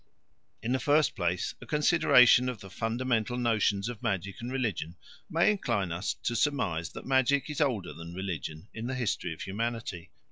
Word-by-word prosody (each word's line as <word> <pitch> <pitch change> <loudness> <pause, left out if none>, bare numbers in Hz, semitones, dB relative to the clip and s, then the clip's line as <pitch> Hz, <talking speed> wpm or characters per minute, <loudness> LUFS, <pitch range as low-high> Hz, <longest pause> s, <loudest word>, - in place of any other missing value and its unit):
In 115 - -1
the 130 - +2
first 145 +5 +3
place 90 0 -1
a - - -10
consideration 130 -5 +5
of 125 -4 -5
the 95 -1 -11
fundamental 120 +1 -1
notions 110 -4 +1
of 120 -3 -6
magic 100 -4 -2
and 120 +2 -5
religion 110 -10 -2 0.3
may 170 +3 +4
incline 115 - -1
us 90 +6 -2
to 120 - -1
surmise 100 - 0
that - - -8
magic 135 +2 +2
is 150 - -3
older 120 -11 0
than 85 +1 -9
religion 90 -2 -5
in 115 +1 -5
the 130 - -2
history 115 -8 -1
of 80 - -6
humanity. 110 -4 -4
115 Hz, 175 wpm, -29 LUFS, 95-130 Hz, 0.3 s, consideration